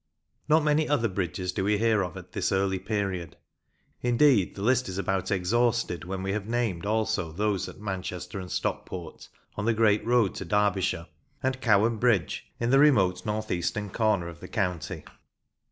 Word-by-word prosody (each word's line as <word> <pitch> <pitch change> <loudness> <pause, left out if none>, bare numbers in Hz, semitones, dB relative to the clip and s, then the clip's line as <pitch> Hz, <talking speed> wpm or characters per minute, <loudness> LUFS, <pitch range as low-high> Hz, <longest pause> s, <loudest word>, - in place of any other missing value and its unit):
Not 155 +1 +5
many 150 0 +2
other 125 -6 +2
bridges 90 -1 -2
do 95 - -2
we 105 +1 +2
hear 110 -1 +2
of 90 -4 -4
at - - -11
this - - -1
early 95 -1 +1
period; 95 -4 -3 0.6
indeed, 120 -5 +3
the 100 - -6
list 125 0 +2
is 95 - -5
about 95 -1 -1
exhausted 110 -1 +1
when 95 +1 -4
we 95 - -1
have 105 0 -3
named 110 -6 -1
also 110 -6 0
those 100 +3 -1
at - - -12
Manchester 95 -2 -5
and 90 -1 -7
Stockport, 85 -4 -4 0.3
on 105 - -2
the 115 -1 +2
great 105 -2 +3
road 115 -3 +2
to - - -4
Derbyshire, 95 -3 +1 0.4
and 130 0 -1
Cowan 110 0 +3
Bridge, 105 -8 +1
in 120 +1 0
the 135 - +6
remote 110 -12 +4
north 110 +1 -2
eastern 100 +3 -2
corner 105 -6 +1
of 85 0 -9
the - - -9
county. 90 -5 -2
100 Hz, 175 wpm, -27 LUFS, 95-115 Hz, 0.6 s, the